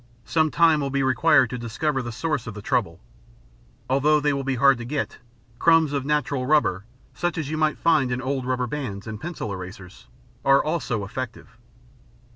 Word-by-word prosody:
Some 155 -1 +2
time 160 -1 +4
will 140 - -1
be 135 0 0
required 130 -1 +4
to 125 - -4
discover 130 +5 -2
the 120 -1 -5
source 150 +1 -2
of 110 - -6
the 105 - -7
trouble. 110 -10 -1 0.9
Although 145 +3 +3
they 145 0 +1
will 140 0 -2
be 135 0 -1
hard 135 0 +4
to - - -5
get, 140 +4 -3 0.4
crumbs 165 -3 +4
of 140 -2 -1
natural 145 -3 0
rubber, 120 -10 +2 0.3
such 175 0 -2
as 155 -2 -3
you 155 - -2
might 155 -1 +1
find 155 -6 +2
in 125 - -1
old 130 -1 -3
rubber 125 -1 0
bands 120 -7 -5
and 110 -1 -7
pencil 160 - -5
erasers, 90 0 -10 0.4
are 135 0 +5
also 125 -9 -2
effective. 125 +2 -7
135 Hz, 185 wpm, -24 LUFS, 120-150 Hz, 0.9 s, are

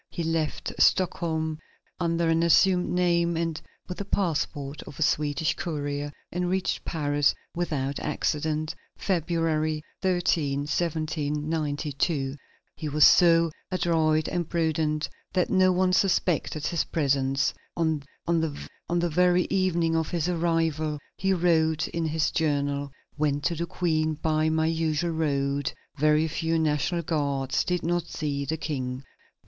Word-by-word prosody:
He 170 - -4
left 160 -1 -2
Stockholm 160 -4 +2 0.4
under 170 -1 +1
an 165 0 +3
assumed 180 +2 +4
name 170 -1 +2
and 165 -1 -2 0.3
with 180 - -6
the 200 - -3
passport 150 -7 -2
of 145 - -10
a - - +1
Swedish 150 +2 +1
courier, 145 -3 -3 0.2
and 180 0 -1
reached 190 0 -1
Paris 145 -3 +1 0.2
without 145 -5 -2
accident, 155 +1 -1 0.2
February 160 -3 0 0.2
13, 165 -6 +1
1792. 150 -2 -1 0.4
He 155 - -4
was 150 +1 +5
so 165 -2 +6 0.2
adroit 160 -4 +1
and 175 -3 -2
prudent 155 -2 0 0.3
that 185 -2 +1
no 185 -1 +5
one 185 0 +2
suspected 175 -5 +1
his 170 -3 +1
presence. 135 -3 +1 0.2
On 160 -3 +1 0.2
the 160 -3 0 0.5
very 180 +2 +3
evening 175 -4 +1
of 160 -1 0
his 170 -1 -1
arrival 165 -3 0 0.2
he 195 +1 0
wrote 165 -3 +2
in 165 -1 -2
his 155 0 0
journal: 145 -2 0 0.3
"Went 145 -1 +1
to 170 - +1
the 170 +1 -3
Queen 155 -2 0
by 155 0 +1
my 160 0 +1
usual 160 +1 0
road; 140 -3 0 0.2
very 155 +2 +3
few 165 +1 -1
National 160 +2 0
Guards; 140 -4 0
did 180 -1 -1
not 175 +1 0
see 145 -4 -3
the 160 +4 -2
King." 130 -4 -4
160 Hz, 130 wpm, -26 LUFS, 150-170 Hz, 0.5 s, so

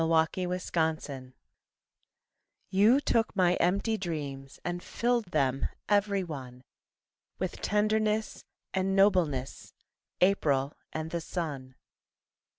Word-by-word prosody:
Houses 165 +3 +1
of 160 -2 +2
Dreams 130 -3 -8 1.4
You 210 +8 +5
took 230 -6 +1
my 180 -2 +4
empty 200 +5 +1
dreams 140 -6 -5
And 175 0 -2
filled 240 +2 0
them 135 -6 0 0.2
every 200 -1 +2
one 130 -6 -8 0.7
With - - -4
tenderness 215 +1 +1 0.3
and 190 0 +1
nobleness, 180 -10 +1 0.4
April 150 -7 +2 0.2
and 160 0 -4
the 170 - -2
sun. 140 -8 -5
175 Hz, 100 wpm, -29 LUFS, 145-200 Hz, 1.4 s, You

